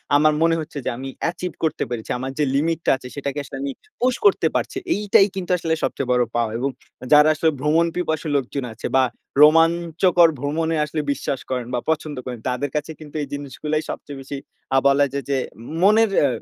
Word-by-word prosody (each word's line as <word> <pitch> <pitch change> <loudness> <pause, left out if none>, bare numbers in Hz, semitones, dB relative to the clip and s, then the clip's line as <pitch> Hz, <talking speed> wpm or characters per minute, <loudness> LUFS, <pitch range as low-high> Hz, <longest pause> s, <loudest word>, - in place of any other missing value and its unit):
আমার 155 +1 +5
মনে 165 0 +4
হচ্ছে 155 -1 -7
যে - - +1
আমি 135 +1 -6
অ্যাচিভ 175 +1 -2
করতে 160 -1 0
পেরেছি। 120 -3 -5
আমার 130 +1 -4
যে 150 - +3
লিমিট 165 +3 +1
টা - - +4
আছে, 125 - -10
সেটাকে 140 0 -3
আসলে 135 - -8
আমি 140 0 -2 0.3
পুশ 250 0 +2
করতে 405 - +5
পারছি। - - -1 0.2
এইটাই 205 -1 +4
কিন্তু 185 -1 -3
আসলে 165 -1 -1
সবচেয়ে 130 -2 -2
বড় 125 0 +4
পাওয়া, 115 -2 +1
এবং 135 +2 0 0.4
যারা 150 +1 +7
আসলে 160 +2 +2
ভ্রমণ 155 +4 +3
পিপাসু 160 -3 -2
লোকজন 135 0 -1
আছে, 110 - -5
বা 130 - +5 0.4
রোমাঞ্চকর 165 +2 +5
ভ্রমণে 160 +4 -1
আসলে 155 +1 -3
বিশ্বাস 135 -1 -2
করেন, 125 -2 -2
বা 125 - +1
পছন্দ 155 -1 -1
করেন 125 -2 -5
তাদের 125 +3 -2
কাছে 150 +1 -2
কিন্তু 150 -1 -12
এই 145 - -3
জিনিসগুলাই 150 +2 -3
সবচেয়ে 140 -2 -6
বেশি। 140 +1 -6 0.4
আ - - +6
বলা 140 +1 +4
যায়, 140 -1 -2
যে 135 - +2 0.4
মনের 215 +2 +5 0.2
এ - - +4
150 Hz, 195 wpm, -22 LUFS, 135-165 Hz, 0.4 s, যারা